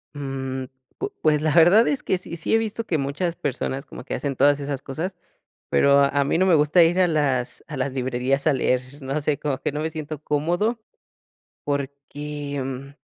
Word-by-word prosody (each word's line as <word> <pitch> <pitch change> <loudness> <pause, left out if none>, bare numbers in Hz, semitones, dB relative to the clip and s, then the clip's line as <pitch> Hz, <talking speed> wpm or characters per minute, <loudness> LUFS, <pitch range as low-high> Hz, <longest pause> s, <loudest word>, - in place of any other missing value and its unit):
Mm, 135 -2 -4 0.3
pu 405 +1 -3
pues, 150 -1 +3
la 155 -1 +1
verdad 175 +7 +7
es 285 - 0
que 190 - +1
sí, 170 -2 -7
sí 160 - -1
he 225 - +6
visto 225 0 -3
que 160 - 0
muchas 160 +5 -2
personas 135 0 -3
como - - -10
que 140 - -6
hacen 140 -2 -3
todas 145 +2 +4
esas 140 -1 -3
cosas, 165 +8 -4 0.5
pero 140 0 +5
a 140 0 +2
mí 145 - +1
no 185 - +3
me 180 - +5
gusta 150 +4 +5
ir 170 +3 +3
a 180 - +5
las 135 -6 0
a 150 - -6
las 130 +1 -1
librerías 130 +2 -1
a - - +4
leer, 130 -1 +2 0.2
no 135 +2 -2
sé, 145 0 0
como 140 -3 -2
que - - -2
no 150 - -3
me 160 +1 -2
siento 155 -1 -6
cómodo, 175 +11 0 0.8
porque, 140 0 -4
mm 135 +2 -7
145 Hz, 200 wpm, -23 LUFS, 135-165 Hz, 0.8 s, verdad